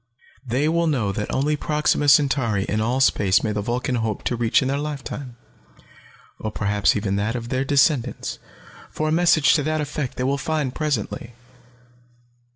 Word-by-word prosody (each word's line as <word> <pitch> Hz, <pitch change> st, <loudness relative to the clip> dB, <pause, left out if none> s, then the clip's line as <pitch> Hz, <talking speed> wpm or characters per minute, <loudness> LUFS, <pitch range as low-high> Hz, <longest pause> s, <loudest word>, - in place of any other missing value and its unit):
They 130 Hz, +4 st, 0 dB
will 170 Hz, +1 st, +1 dB
know 120 Hz, -10 st, 0 dB
that 105 Hz, +2 st, -4 dB
only 145 Hz, +3 st, +1 dB
Proxima 150 Hz, 0 st, 0 dB
Centauri 135 Hz, -8 st, +3 dB
in 110 Hz, +2 st, -1 dB
all 120 Hz, +4 st, 0 dB
space 100 Hz, -7 st, +3 dB
may 110 Hz, -, 0 dB
the 105 Hz, -1 st, -2 dB
Vulcan 125 Hz, +4 st, -2 dB
hope 110 Hz, -3 st, -2 dB
to 125 Hz, -, -1 dB
reach 120 Hz, +3 st, +2 dB
in -, -, -1 dB
their 140 Hz, +1 st, -1 dB
lifetime, 140 Hz, -3 st, -6 dB, 1.0 s
or 110 Hz, -, -3 dB
perhaps 105 Hz, -1 st, +1 dB
even 105 Hz, -1 st, -2 dB
in 100 Hz, -, 0 dB
that 105 Hz, +4 st, -1 dB
of 120 Hz, -1 st, -5 dB
their 130 Hz, +1 st, 0 dB
descendants, 135 Hz, -2 st, +1 dB, 0.5 s
for 155 Hz, -, -3 dB
a -, -, 0 dB
message 165 Hz, -3 st, +4 dB
to 155 Hz, -, +2 dB
that 155 Hz, +2 st, -1 dB
effect 145 Hz, -2 st, -4 dB
they 125 Hz, -, -1 dB
will 140 Hz, +2 st, 0 dB
find 150 Hz, -3 st, -2 dB
presently. 140 Hz, -6 st, -3 dB
130 Hz, 175 wpm, -22 LUFS, 115-150 Hz, 1.0 s, message